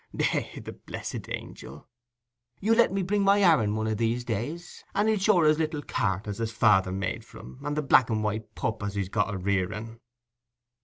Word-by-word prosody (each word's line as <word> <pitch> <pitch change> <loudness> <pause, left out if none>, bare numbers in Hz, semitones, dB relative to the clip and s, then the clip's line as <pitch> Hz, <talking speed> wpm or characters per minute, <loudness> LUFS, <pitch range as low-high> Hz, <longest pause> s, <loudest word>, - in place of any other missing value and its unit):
Eh, - - -1
the - - -8
blessed - - -7
angil! - - -8 0.7
You'll 225 +3 +2
let 235 - +5
me 195 0 -1
bring 205 +3 0
my 200 +1 +4
Aaron 115 - +4
one 110 0 -1
o' 110 - 0
these 115 +2 0
days, 125 - -5
and 205 +2 +2
he'll 220 -2 +2
show 195 -2 +4
her - - +3
his 155 +1 +4
little 155 -2 -2
cart 95 -2 -1
as 105 0 -5
his 115 -1 -2
father's 95 -4 +3
made 95 +1 -3
for - - -15
him, 65 +1 -12
and 145 0 -3
the 150 - 0
black 130 -3 +5
and 110 -1 0
white 110 +1 -3
pup 110 -1 -2
as 100 0 -4
he's 100 -2 -2
got 105 +1 0
a 100 - -3
rearing." 100 +4 -2
115 Hz, 210 wpm, -27 LUFS, 105-165 Hz, 0.7 s, let